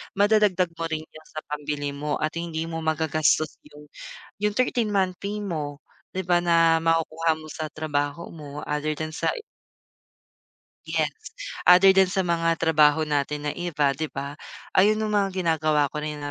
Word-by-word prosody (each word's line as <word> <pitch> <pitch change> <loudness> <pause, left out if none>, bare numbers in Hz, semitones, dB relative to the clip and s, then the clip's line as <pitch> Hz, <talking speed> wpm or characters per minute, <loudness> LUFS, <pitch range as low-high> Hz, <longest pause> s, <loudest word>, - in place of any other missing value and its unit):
madadagdag 200 -4 +3
mo 165 - -5
rin 155 0 -3
yan 155 0 -16
sa 155 - -5
pambili 145 -1 -3
mo 150 +1 -2
at 155 +2 -2
hindi 165 -1 -3
mo 165 0 -4
magagastos 155 -1 +1 0.2
yung, 150 0 -14 0.5
yung 210 0 0
13th 240 -4 +1
month 185 -2 +1
pay 205 +1 -4
mo 150 -6 -4 0.4
di 190 - -1
ba 175 0 +3
na 165 -1 +4
makukuha 165 0 +1
mo 155 - -11
sa 155 -1 -4
trabaho 145 0 -3
mo 150 -2 -8
other 150 +1 -2
than 155 +1 -4
sa 155 - -1 1.6
yes, 160 -2 0 0.6
other 180 +2 +8
than 190 -1 +6
sa 195 -1 +1
mga 165 -1 +2
trabaho 155 -1 +4
natin 150 0 -1
na 145 - 0
iba 150 -6 0
'di 155 +2 -4
ba, 140 +1 -5 0.4
ayun 210 +3 +5
yung 210 - -2
mga 200 -1 +2
ginagawa 155 -3 +2
ko 150 -1 -5
na 150 -1 -4
160 Hz, 165 wpm, -25 LUFS, 150-175 Hz, 1.6 s, other